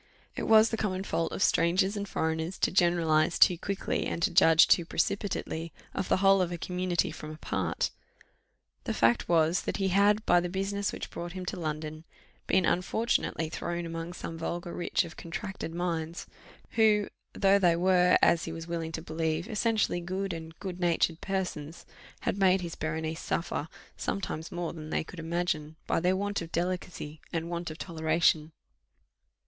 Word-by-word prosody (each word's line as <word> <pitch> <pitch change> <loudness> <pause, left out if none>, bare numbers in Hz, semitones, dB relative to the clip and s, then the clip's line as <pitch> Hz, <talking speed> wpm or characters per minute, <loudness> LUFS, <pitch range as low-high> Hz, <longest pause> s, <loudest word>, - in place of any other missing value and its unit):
It - - -3
was 220 0 +6
the 225 - -1
common 190 -3 -1
fault 165 -4 -1
of - - 0
strangers 185 +4 +3
and 200 -1 -4
foreigners 160 +3 -1
to - - +1
generalize 170 -3 +3
too 180 - +7
quickly, 195 +3 -2
and - - -3
to 200 - +3
judge 160 0 +7 0.2
precipitately 170 -3 -2 0.2
of - - -3
the - - +4
whole 195 0 +6
of 180 -1 0
a 175 - -3
community 180 0 -1
from 155 - -8
a 155 - -8
part. - - -1 0.9
The - - -2
fact 115 +1 +2
was, 165 +1 +3
that - - -3
he 195 -1 +1
had, 205 +3 +3
by 175 - +5
the 175 0 -2
business 195 +2 -1
which - - -6
brought 170 0 -6
him 185 -1 -6
to 180 - -4
London, 155 -1 -4 0.4
been 190 -1 +3
unfortunately 180 -2 0
thrown 170 +2 -4
among 165 +1 -5
some 165 -2 -6
vulgar 175 +1 -4
rich 175 - 0
of 170 - -11
contracted 180 +1 -5
minds, 170 -1 -3 0.5
who, 215 -2 +4 0.3
though 195 0 +4
they 175 -3 +4
were, 180 0 +4
as 170 -1 +4
he 165 - -4
was 165 0 -6
willing 165 -1 -3
to 160 - -4
believe, 160 +2 -2
essentially 220 -4 +1
good 190 +2 -3
and 160 0 -8
good 185 -3 -6
natured 170 -1 +1
persons, 180 -5 -4 0.4
had 200 - -1
made 190 -1 +4
his 170 -2 -5
Berenice 160 +1 -3
suffer, 165 -2 -2 0.3
sometimes 175 -4 -3
more 175 -2 -3
than 155 -2 -8
they - - 0
could 165 +2 -11
imagine, 165 -2 -2
by - - +1
their 180 +2 +2
want 200 0 -1
of 165 0 -7
delicacy, 175 -3 -3
and 165 0 -3
want 170 0 -3
of 155 - -8
toleration. 160 -2 +1
175 Hz, 175 wpm, -29 LUFS, 160-190 Hz, 0.9 s, too